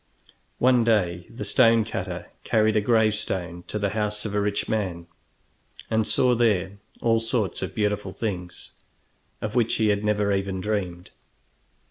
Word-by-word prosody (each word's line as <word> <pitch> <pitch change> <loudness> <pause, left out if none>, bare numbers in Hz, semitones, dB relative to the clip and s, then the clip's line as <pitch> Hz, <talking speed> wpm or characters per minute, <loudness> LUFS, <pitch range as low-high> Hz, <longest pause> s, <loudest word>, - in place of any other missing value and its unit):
One 125 -1 +4
day 90 -6 +1
the 120 - -7
stone 115 -3 +4
cutter 110 - -5
carried 110 -1 +2
a 105 - +4
gravestone 105 -6 0
to - - -3
the 100 -1 -1
house 105 0 -2
of 105 - -3
a 105 - +1
rich 100 0 -1
man, 95 -6 -2 0.9
and 110 -1 +2
saw 125 +4 +4
there 100 -5 +1 0.3
all 115 -1 +3
sorts 115 -3 -1
of - - -4
beautiful 105 -2 -1
things, 90 -5 -4 0.7
of 105 0 -3
which 120 -2 +2
he 110 -1 +2
had 100 0 +1
never 105 -1 +1
even 95 -1 -1
dreamed. 90 -4 -3
105 Hz, 150 wpm, -25 LUFS, 95-110 Hz, 0.9 s, One